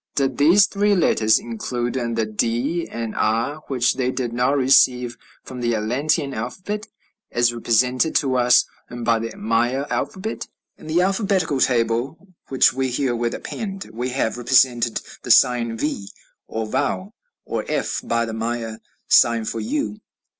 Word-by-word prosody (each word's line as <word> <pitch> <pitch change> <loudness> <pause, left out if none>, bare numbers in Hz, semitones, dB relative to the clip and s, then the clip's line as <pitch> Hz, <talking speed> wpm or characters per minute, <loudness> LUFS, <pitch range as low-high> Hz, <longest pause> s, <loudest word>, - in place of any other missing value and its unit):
Did 135 -2 0
these 175 +8 +6
three 205 +1 +1
letters 110 - +3
include 120 +1 -4
the 115 -3 -1
d 120 +10 -1
and 115 -1 -5
r, 115 +7 0
which 125 -3 +1
they 125 -1 0
did 125 -2 -3
not 125 +4 +1
receive 125 -2 +4 0.3
from 130 -1 -8
the 120 -1 +1
Atlantean 140 +7 0
alphabet, 185 - -5 0.4
as 120 0 +2
represented 125 +6 +1
to 130 -2 +2
us 125 0 +4 0.2
by 115 -1 0
the 115 0 -6
Maya 120 +5 0
alphabet? 215 +4 -3 0.3
In - - -14
the 165 +3 +2
alphabetical 190 -7 0
table 125 - 0
which 130 -2 +4
we 130 0 -1
herewith 120 -2 -1
append 195 -3 -6
we 120 +3 -3
have 125 -2 -1
represented 120 -1 +3 0.2
the - - -9
sign 120 -3 +4
V, 110 -8 -3 0.4
or 110 0 -3
vau, 185 - -2 0.3
or - - -3
f, - - -2
by 115 0 0
the 115 - -6
Maya 115 0 -3 0.3
sign 115 -1 +4
for 115 - -3
U. 270 -4 -3
125 Hz, 145 wpm, -22 LUFS, 115-145 Hz, 0.4 s, these